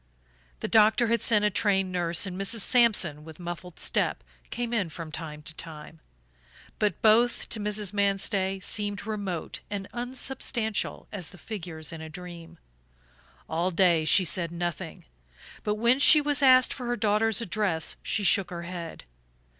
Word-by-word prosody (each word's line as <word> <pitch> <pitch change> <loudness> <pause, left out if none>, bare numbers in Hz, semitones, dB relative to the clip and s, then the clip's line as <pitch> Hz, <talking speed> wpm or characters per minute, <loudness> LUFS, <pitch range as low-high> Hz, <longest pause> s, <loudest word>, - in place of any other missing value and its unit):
The - - -2
doctor 220 +2 +4
had 235 0 +1
sent 210 -3 +3
a 210 - +2
trained 195 -1 +1
nurse, 175 0 +1
and 185 -2 -6
Mrs. 195 +4 0
Sampson, 205 - +3
with 160 +1 -12
muffled 175 0 -7
step, - - 0 0.3
came 240 0 -4
in 200 -7 0
from 160 0 -8
time 150 -1 -7
to 165 - -2
time; 155 0 -9 0.8
but 210 -1 -1
both, 230 +2 +3
to 220 - -2
Mrs. 210 -1 -2
Manstey, 195 -1 0
seemed 205 -1 -2
remote 200 -6 -4
and 200 -1 -5
unsubstantial 245 -3 -2
as 185 -6 -5
the 185 - -13
figures 170 -7 -7
in 160 - -8
a 160 - -8
dream. 170 0 -10 0.9
All 170 +3 -1
day 175 -3 +3
she 180 +5 +5
said 170 0 +1
nothing; 175 -1 -5 0.6
but 210 - -1
when 235 +4 +2
she 300 +2 +8
was 290 -1 0
asked 255 -2 +6
for 250 -2 -7
her 240 - 0
daughter's 215 0 +1
address 200 -7 -1
she 210 - -1
shook 190 -1 +3
her 170 -1 -6
head. 170 -2 -7
195 Hz, 160 wpm, -27 LUFS, 170-220 Hz, 0.9 s, she